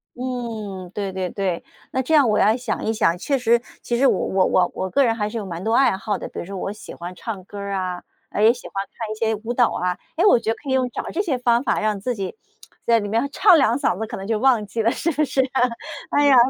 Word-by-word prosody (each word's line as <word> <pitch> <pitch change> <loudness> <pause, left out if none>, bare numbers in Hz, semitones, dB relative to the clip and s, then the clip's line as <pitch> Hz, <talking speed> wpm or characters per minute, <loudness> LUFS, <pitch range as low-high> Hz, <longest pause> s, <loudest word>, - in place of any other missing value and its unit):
嗯， 225 -7 -5
对 200 -2 -2
对 185 -1 -3
对， 185 -3 -2 0.3
那 260 - 0
这 290 +5 -1
样 285 -5 +6
我 210 - +2
要 215 +2 +4
想 250 - -3
一 220 - +1
想， 195 -6 +2
确 275 +9 0
实 235 -1 +3 0.2
其 240 - -1
实 275 - +4
我 - - +2
我 190 -1 +2
我 180 -1 +2
我 190 - -3
个 280 - +3
人 230 -3 +2
还 210 -2 -1
是 230 - -5
有 215 - -4
蛮 175 -1 -6
多 225 - 0
爱 260 -7 +4
好 205 +1 -2
的， - - -6
比 - - -7
如 - - -5
说 195 +2 -6
我 195 +2 -3
喜 215 - -10
欢 175 +1 -7
唱 205 -1 -6
歌 200 +2 -9
儿 200 0 -4
啊， 185 -2 -2 0.3
诶 210 - +2
也 230 - +7
喜 245 - -10
欢 195 0 -3
看 225 -2 -4
一 - - -3
些 220 0 0
舞 240 - 0
蹈 245 -1 +4
啊。 180 0 -1 0.2
诶 345 +5 +2
我 250 - +6
觉 225 - -3
得 225 - -1
可 275 - -9
以 - - +1
用 255 -1 +2
找 - - -4
这 365 - 0
些 320 -10 -1
方 240 0 +2
法 245 - +1
让 215 -2 0
自 245 +4 -2
己， 195 - -4 0.5
在 235 -1 +5
里 205 - -4
面 230 +7 0
唱 375 +3 +6
两 255 -4 +3
嗓 195 -8 0
子， 220 - -3
可 - - -6
能 195 - -6
就 220 0 0
忘 245 -5 +3
记 225 +3 -2
了 225 - +3
是 335 - -1
不 305 +1 +1
是 270 -2 +1
啊？ 265 - +2 0.5
哎 290 0 +3
呀， 280 - +6
225 Hz, 305 characters per minute, -22 LUFS, 195-250 Hz, 0.5 s, 也